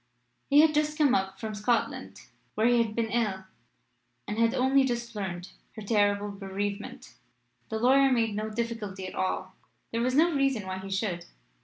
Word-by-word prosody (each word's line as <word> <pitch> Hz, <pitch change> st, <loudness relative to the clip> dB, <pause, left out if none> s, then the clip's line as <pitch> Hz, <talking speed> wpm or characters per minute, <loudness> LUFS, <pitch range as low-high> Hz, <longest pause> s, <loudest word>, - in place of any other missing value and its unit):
He 290 Hz, +1 st, +7 dB
had 315 Hz, -1 st, +4 dB
just 300 Hz, 0 st, 0 dB
come 290 Hz, -5 st, +4 dB
up 195 Hz, -3 st, -1 dB
from 220 Hz, -1 st, -4 dB
Scotland, 220 Hz, +3 st, -1 dB, 0.3 s
where 220 Hz, -, +1 dB
he 240 Hz, 0 st, +5 dB
had 220 Hz, -2 st, -2 dB
been 225 Hz, -2 st, -1 dB
ill, 210 Hz, -5 st, 0 dB, 0.8 s
and 210 Hz, +2 st, -3 dB
had 230 Hz, +2 st, +3 dB
only 265 Hz, +1 st, +4 dB
just 235 Hz, -2 st, -3 dB
learned 185 Hz, -3 st, -5 dB, 0.2 s
her 215 Hz, -, -7 dB
terrible 205 Hz, -1 st, +1 dB
bereavement. 200 Hz, +1 st, -5 dB, 0.6 s
The 220 Hz, -, -2 dB
lawyer 270 Hz, +4 st, +4 dB
made 225 Hz, -3 st, +2 dB
no 215 Hz, +1 st, -3 dB
difficulty 215 Hz, -4 st, -4 dB
at 185 Hz, -, -7 dB
all. 185 Hz, -, -2 dB, 0.4 s
There 230 Hz, -, -1 dB
was 255 Hz, +2 st, +1 dB
no 330 Hz, +3 st, +4 dB
reason 270 Hz, -7 st, +1 dB
why 190 Hz, 0 st, -4 dB
he 190 Hz, +1 st, -8 dB
should. 190 Hz, -3 st, -2 dB
220 Hz, 175 wpm, -28 LUFS, 200-250 Hz, 0.8 s, He